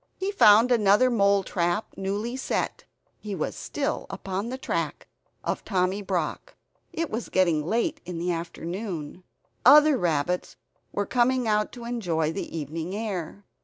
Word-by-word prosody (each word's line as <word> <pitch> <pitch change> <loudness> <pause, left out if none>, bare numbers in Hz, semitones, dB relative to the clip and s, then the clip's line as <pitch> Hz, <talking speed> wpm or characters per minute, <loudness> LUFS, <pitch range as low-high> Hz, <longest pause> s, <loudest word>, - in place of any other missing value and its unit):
He 385 +1 -2
found 230 - +6
another 225 +2 +4
mole 200 -3 +3
trap 175 +3 -1
newly 205 +5 -3
set; 265 - -2 0.3
he 210 -2 -5
was 155 - -3
still 295 +1 -3
upon 195 +4 -4
the 260 - -4
track - - -3 0.4
of - - -2
Tommy 190 0 0
Brock. 185 -5 -3 0.4
It 330 -1 -3
was 225 +2 -4
getting 170 -5 +2
late 265 - 0
in 180 -2 -6
the 175 +2 -1
afternoon. 170 0 -5 0.4
Other 295 +1 +7
rabbits 175 +1 -1 0.4
were 205 - -1
coming 250 +2 +2
out 210 0 +1
to 240 -2 -9
enjoy 175 -10 -1
the 180 -3 -5
evening 160 +5 -4
air. 200 -3 -4
200 Hz, 145 wpm, -26 LUFS, 175-235 Hz, 0.4 s, Other